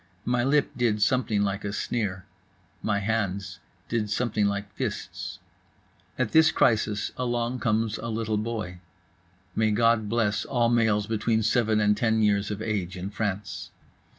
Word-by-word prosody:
My 120 Hz, 0 st, +1 dB
lip 140 Hz, +2 st, +2 dB
did 115 Hz, -4 st, +1 dB
something 110 Hz, -2 st, +2 dB
like 100 Hz, 0 st, -2 dB
a 100 Hz, -, -2 dB
sneer. 100 Hz, -4 st, -2 dB, 0.6 s
My 100 Hz, -2 st, 0 dB
hands 100 Hz, -3 st, -2 dB, 0.3 s
did 110 Hz, -3 st, -1 dB
something 110 Hz, -2 st, +1 dB
like 100 Hz, -1 st, -3 dB
fists. -, -, -4 dB, 0.8 s
At 130 Hz, -4 st, 0 dB
this 160 Hz, 0 st, +6 dB
crisis 110 Hz, -2 st, +2 dB
along 120 Hz, 0 st, -1 dB
comes 110 Hz, -1 st, 0 dB
a -, -, -5 dB
little 110 Hz, -2 st, -1 dB
boy. 105 Hz, -5 st, -4 dB, 0.8 s
May 110 Hz, -1 st, +3 dB
God 110 Hz, 0 st, +3 dB
bless 110 Hz, -2 st, +1 dB
all 120 Hz, -3 st, +1 dB
males 110 Hz, -3 st, +2 dB
between 110 Hz, +1 st, 0 dB
seven 110 Hz, -1 st, +2 dB
and 105 Hz, 0 st, +3 dB
ten 110 Hz, 0 st, +2 dB
years 105 Hz, -1 st, +2 dB
of 105 Hz, +1 st, -4 dB
age 95 Hz, -5 st, -2 dB
in 95 Hz, +2 st, -5 dB
France! 100 Hz, -3 st, -3 dB
110 Hz, 150 wpm, -26 LUFS, 105-115 Hz, 0.8 s, this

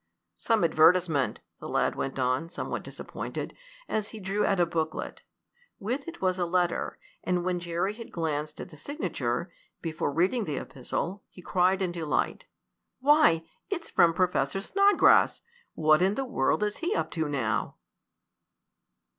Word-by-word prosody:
"Some 225 Hz, -5 st, +1 dB
advertisement," 165 Hz, -3 st, +3 dB, 0.2 s
the -, -, -7 dB
lad -, -, +1 dB
went 135 Hz, -, -3 dB
on, 130 Hz, +5 st, 0 dB
somewhat -, -, -4 dB
disappointed, -, -, -6 dB, 0.3 s
as 215 Hz, -1 st, -1 dB
he 220 Hz, -, -9 dB
drew 195 Hz, +1 st, -1 dB
out 195 Hz, -, +2 dB
a 175 Hz, -, +5 dB
booklet. 160 Hz, -2 st, -3 dB, 0.6 s
With 250 Hz, -, -3 dB
it 335 Hz, -, -7 dB
was 185 Hz, -1 st, 0 dB
a 175 Hz, -, +2 dB
letter, 175 Hz, 0 st, 0 dB, 0.3 s
and 180 Hz, -1 st, 0 dB
when 180 Hz, -1 st, 0 dB
Jerry 175 Hz, +3 st, -1 dB
had 230 Hz, +1 st, -10 dB
glanced 155 Hz, -2 st, -3 dB
at -, -, -7 dB
the 155 Hz, -, -14 dB
signature, 170 Hz, -, -3 dB, 0.3 s
before 155 Hz, -3 st, -2 dB
reading 190 Hz, -, +1 dB
the 150 Hz, -3 st, -3 dB
epistle, 175 Hz, +11 st, -4 dB
he 180 Hz, -, -14 dB
cried 185 Hz, +1 st, +2 dB
in 180 Hz, -, -1 dB
delight. 165 Hz, -3 st, -1 dB, 0.5 s
"Why, 280 Hz, -, +5 dB, 0.3 s
it's 355 Hz, -5 st, -4 dB
from 165 Hz, -1 st, +4 dB
Professor 180 Hz, -3 st, +1 dB
Snodgrass! 400 Hz, -, +4 dB, 0.3 s
What 155 Hz, +1 st, +4 dB
in 190 Hz, +3 st, +3 dB
the 270 Hz, -, -2 dB
world 210 Hz, -, +1 dB
is 210 Hz, 0 st, -1 dB
he 350 Hz, +6 st, -1 dB
up -, -, -1 dB
to 160 Hz, -2 st, -1 dB
now?" 115 Hz, -7 st, -1 dB
180 Hz, 155 wpm, -28 LUFS, 155-210 Hz, 0.6 s, a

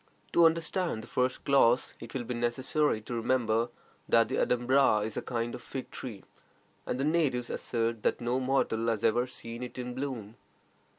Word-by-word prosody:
To 170 Hz, -, +6 dB
understand 165 Hz, -5 st, -1 dB
the -, -, -11 dB
first 125 Hz, 0 st, -1 dB
clause, 130 Hz, -3 st, +4 dB
it -, -, -9 dB
will 130 Hz, -, -1 dB
be 125 Hz, -, -4 dB
necessary 120 Hz, +2 st, 0 dB
to 115 Hz, -, -7 dB
remember 115 Hz, -1 st, +1 dB, 0.4 s
that 115 Hz, 0 st, +4 dB
the -, -, -1 dB
adumbra 125 Hz, -3 st, +3 dB
is 110 Hz, -, -5 dB
a -, -, -2 dB
kind 120 Hz, -1 st, -2 dB
of -, -, -7 dB
fig 135 Hz, -, -7 dB
tree, 110 Hz, -7 st, -7 dB, 0.6 s
and 125 Hz, -, -2 dB
the -, -, +1 dB
natives 145 Hz, -6 st, +1 dB
assert 115 Hz, -2 st, -1 dB
that -, -, +1 dB
no 120 Hz, +1 st, 0 dB
mortal 130 Hz, -3 st, +1 dB
has 115 Hz, -2 st, 0 dB
ever 120 Hz, +3 st, +3 dB
seen 115 Hz, -1 st, -7 dB
it 125 Hz, 0 st, -7 dB
in 125 Hz, 0 st, -4 dB
bloom. 125 Hz, -5 st, -5 dB
125 Hz, 180 wpm, -30 LUFS, 115-130 Hz, 0.6 s, To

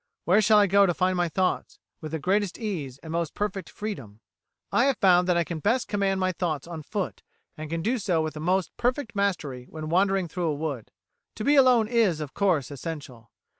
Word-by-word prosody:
Where 190 Hz, +5 st, +5 dB
shall 215 Hz, +1 st, +5 dB
I 205 Hz, -, +6 dB
go 200 Hz, +1 st, +5 dB
to 175 Hz, -, 0 dB
find 185 Hz, 0 st, +1 dB
my 175 Hz, -1 st, +1 dB
thoughts 185 Hz, +2 st, -1 dB, 0.2 s
with 155 Hz, -2 st, -6 dB
the 160 Hz, -, -1 dB
greatest 190 Hz, +4 st, 0 dB
ease 165 Hz, -, -4 dB
and 160 Hz, -, -7 dB
most 165 Hz, -2 st, -2 dB
perfect 200 Hz, -4 st, -3 dB
freedom? 135 Hz, -, -7 dB, 0.5 s
"I 235 Hz, -, +3 dB
have 275 Hz, -4 st, +2 dB
found 180 Hz, -2 st, +4 dB
that 180 Hz, -1 st, +3 dB
I 170 Hz, -, +3 dB
can 165 Hz, -1 st, -5 dB
best 230 Hz, -, +1 dB
command 195 Hz, -2 st, 0 dB
my 185 Hz, 0 st, +1 dB
thoughts 165 Hz, -6 st, -2 dB
on 170 Hz, -2 st, -7 dB
foot, 195 Hz, +5 st, -4 dB, 0.3 s
and 155 Hz, 0 st, -7 dB
can 165 Hz, 0 st, -3 dB
do 245 Hz, +4 st, 0 dB
so 185 Hz, -5 st, 0 dB
with 155 Hz, -1 st, -3 dB
the 150 Hz, -, -7 dB
most 180 Hz, +2 st, 0 dB
perfect 245 Hz, -1 st, -1 dB
mastery 160 Hz, -11 st, -1 dB
when 155 Hz, -1 st, -6 dB
wandering 190 Hz, +1 st, +2 dB
through 175 Hz, +1 st, -3 dB
a 150 Hz, -, 0 dB
wood. 145 Hz, -6 st, -4 dB, 0.5 s
To -, -, -5 dB
be 285 Hz, -, +3 dB
alone 250 Hz, -5 st, +5 dB
is, 220 Hz, -9 st, +2 dB
of 150 Hz, -3 st, -6 dB
course, 170 Hz, -10 st, +1 dB
essential. 140 Hz, -6 st, -7 dB
180 Hz, 215 wpm, -26 LUFS, 155-205 Hz, 0.5 s, I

